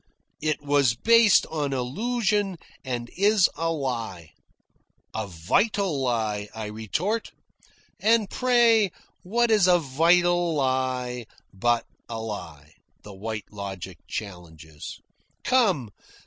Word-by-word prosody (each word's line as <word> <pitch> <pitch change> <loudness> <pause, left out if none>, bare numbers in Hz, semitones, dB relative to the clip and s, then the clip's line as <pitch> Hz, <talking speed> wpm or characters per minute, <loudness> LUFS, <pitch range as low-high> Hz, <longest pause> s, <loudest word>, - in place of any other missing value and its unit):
"It 155 -1 -1
was 140 -4 +3
based 230 - +5
on 145 -3 -1
illusion 205 - 0 0.3
and 120 -3 -3
is 205 0 +4
a 165 +2 -1
lie." 115 - -4 0.8
"A 110 -1 -3
vital 150 - 0
lie," 110 -5 -1
I 110 -1 -4
retort. 110 - -2 0.7
"And 220 -1 +3
pray 235 -3 +3 0.3
what 235 +5 +1
is 210 -4 +5
a 180 -1 +6
vital 170 +3 +2
lie 130 -3 -1 0.3
but 120 +4 +1 0.2
a 115 -1 -4
lie?" 85 -9 -7 0.3
the 105 - -10
White 105 +1 -6
Logic 95 -4 -7
challenges. 80 -6 -8 0.4
"Come. 195 - +2
130 Hz, 105 wpm, -25 LUFS, -, 0.8 s, a